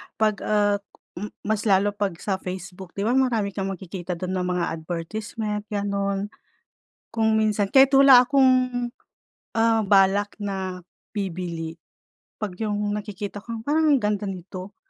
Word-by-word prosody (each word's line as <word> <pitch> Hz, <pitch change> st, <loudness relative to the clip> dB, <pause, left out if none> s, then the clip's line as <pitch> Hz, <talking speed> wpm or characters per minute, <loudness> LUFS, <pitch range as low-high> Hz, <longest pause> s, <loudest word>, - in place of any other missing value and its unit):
'pag, 215 Hz, -2 st, +1 dB
uh, 205 Hz, -1 st, +2 dB, 0.4 s
m 210 Hz, -, -4 dB, 0.2 s
mas 215 Hz, +1 st, -1 dB
lalo 200 Hz, +1 st, +4 dB
'pag 200 Hz, -3 st, -2 dB
sa 190 Hz, -2 st, -1 dB
Facebook. 185 Hz, 0 st, -8 dB
Di 200 Hz, -, -2 dB
ba 225 Hz, -, +1 dB
marami 240 Hz, -6 st, +2 dB
kang 195 Hz, 0 st, -3 dB
magkikita 180 Hz, 0 st, -6 dB
dun 180 Hz, +2 st, -4 dB
na 180 Hz, -, -1 dB
mga 180 Hz, -1 st, 0 dB
advertisement, 210 Hz, +6 st, -4 dB
ganun. 200 Hz, -1 st, -2 dB, 0.8 s
Kung 220 Hz, -1 st, +1 dB
minsan, 210 Hz, -2 st, +1 dB
kahit 270 Hz, 0 st, +8 dB
wala 265 Hz, -2 st, +8 dB
akong, 275 Hz, -2 st, +5 dB, 1.1 s
ah, 225 Hz, 0 st, +4 dB
balak 200 Hz, 0 st, +3 dB
na 190 Hz, -3 st, -4 dB, 0.3 s
bibili, 170 Hz, -4 st, -4 dB, 0.5 s
'pag 195 Hz, -4 st, -5 dB
yung 210 Hz, -1 st, -1 dB
nakikita 205 Hz, -1 st, -5 dB
ko, 230 Hz, +3 st, -7 dB
"Parang 305 Hz, +2 st, +3 dB
ang -, -, +2 dB
ganda 210 Hz, 0 st, 0 dB
nito." 185 Hz, +1 st, -7 dB
205 Hz, 140 wpm, -24 LUFS, 185-215 Hz, 1.1 s, kahit